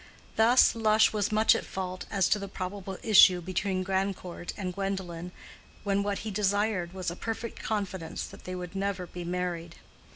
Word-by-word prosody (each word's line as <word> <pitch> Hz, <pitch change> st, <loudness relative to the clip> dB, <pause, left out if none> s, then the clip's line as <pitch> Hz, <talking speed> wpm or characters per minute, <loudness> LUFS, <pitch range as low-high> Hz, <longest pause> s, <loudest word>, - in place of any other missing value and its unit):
Thus 235 Hz, +3 st, +6 dB
Lush 220 Hz, -1 st, +4 dB
was 205 Hz, -1 st, 0 dB
much 215 Hz, +1 st, +5 dB
at -, -, -2 dB
fault 185 Hz, -1 st, -5 dB
as 195 Hz, -3 st, +2 dB
to 210 Hz, -, +3 dB
the 200 Hz, -, -5 dB
probable 190 Hz, 0 st, -5 dB
issue 190 Hz, -4 st, +7 dB
between 185 Hz, +2 st, -1 dB
Grandcourt 190 Hz, -2 st, -2 dB
and 185 Hz, -3 st, -3 dB
Gwendolen, 180 Hz, -3 st, -4 dB, 0.5 s
when 200 Hz, -1 st, +1 dB
what 200 Hz, 0 st, -1 dB
he 215 Hz, -, -3 dB
desired 205 Hz, -2 st, 0 dB
was 185 Hz, -2 st, -3 dB
a -, -, -6 dB
perfect 225 Hz, +3 st, -5 dB
confidence 190 Hz, -6 st, -3 dB
that -, -, -13 dB
they 185 Hz, -, -4 dB
would 180 Hz, +1 st, -7 dB
never 195 Hz, -2 st, -2 dB
be 175 Hz, 0 st, -8 dB
married. 175 Hz, -1 st, -3 dB
190 Hz, 170 wpm, -29 LUFS, 180-205 Hz, 0.5 s, issue